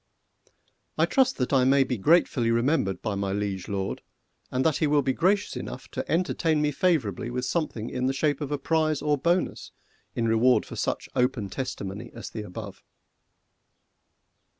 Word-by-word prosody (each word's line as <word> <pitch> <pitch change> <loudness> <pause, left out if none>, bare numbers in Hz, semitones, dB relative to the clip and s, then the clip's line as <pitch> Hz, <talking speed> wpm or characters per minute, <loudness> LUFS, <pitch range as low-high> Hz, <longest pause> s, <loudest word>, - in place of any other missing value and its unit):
I - - +4
trust 265 -1 +2
that 125 +1 -1
I 130 -2 +5
may 135 +1 +5
be 130 -1 -2
gratefully 135 - +3
remembered 115 - +1
by 110 - -1
my 100 -1 -2
Liege 100 -2 -3
Lord, 100 -2 -3 0.5
and 130 +1 -1
that 155 - +3
he 155 - +1
will 145 -1 +3
be 130 0 +1
gracious 195 +7 +1
enough - - -7
to - - -5
entertain 165 -2 +1
me 150 0 +1
favourably 130 - 0
with 125 +1 -2
something 130 -7 -2
in 125 0 -1
the - - +2
shape 145 +1 0
of 145 -1 -3
prize 155 -2 +1
or 150 -1 +3
bonus 170 +5 -1 0.4
in 115 -1 0
reward 115 +3 +4
for - - -9
such - - -2
open 125 -5 0
testimony 120 -5 -5
as 115 - -7
the 110 - -5
above. 100 0 -8
130 Hz, 170 wpm, -26 LUFS, 110-150 Hz, 0.5 s, I